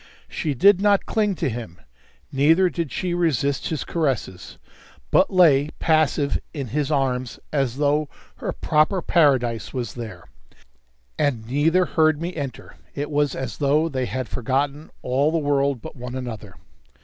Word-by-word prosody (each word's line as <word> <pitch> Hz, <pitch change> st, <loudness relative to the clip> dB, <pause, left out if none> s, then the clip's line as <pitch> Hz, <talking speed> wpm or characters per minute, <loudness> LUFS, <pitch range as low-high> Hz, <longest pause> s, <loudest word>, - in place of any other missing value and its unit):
She 150 Hz, -3 st, -3 dB
did 195 Hz, +8 st, +5 dB
not 205 Hz, -1 st, +3 dB
cling 210 Hz, -3 st, 0 dB
to -, -, -1 dB
him. 110 Hz, -8 st, -6 dB, 0.5 s
Neither 165 Hz, +7 st, +4 dB
did 165 Hz, -6 st, -3 dB
she 180 Hz, -2 st, -2 dB
resist 145 Hz, -5 st, 0 dB
his 155 Hz, -4 st, -3 dB
caresses, 135 Hz, -, -3 dB, 0.5 s
but -, -, +4 dB
lay 155 Hz, -6 st, +5 dB
passive 155 Hz, -3 st, +1 dB, 0.2 s
in 135 Hz, -5 st, -4 dB
his 145 Hz, +3 st, -1 dB
arms 130 Hz, -4 st, -1 dB
as 135 Hz, -4 st, 0 dB
though 150 Hz, +1 st, +1 dB, 0.3 s
her -, -, -3 dB
proper 160 Hz, +4 st, +1 dB
paradise 130 Hz, -10 st, +2 dB
was 120 Hz, -5 st, -3 dB
there. 110 Hz, -8 st, -8 dB, 1.0 s
And 125 Hz, -7 st, 0 dB
neither 160 Hz, +8 st, +2 dB
heard 155 Hz, -2 st, +2 dB
me 175 Hz, +2 st, -4 dB
enter; 140 Hz, -5 st, -7 dB, 0.2 s
it 145 Hz, +1 st, -4 dB
was 145 Hz, -1 st, +1 dB
as 130 Hz, -, -5 dB
though 150 Hz, +3 st, +2 dB
they 130 Hz, -4 st, -2 dB
had 130 Hz, -2 st, -3 dB
forgotten 140 Hz, +6 st, -2 dB
all 135 Hz, +5 st, +1 dB
the 165 Hz, -, +1 dB
world 140 Hz, -4 st, 0 dB
but -, -, -9 dB
one 125 Hz, -1 st, -7 dB
another. 110 Hz, -7 st, -7 dB
145 Hz, 150 wpm, -23 LUFS, 130-160 Hz, 1.0 s, did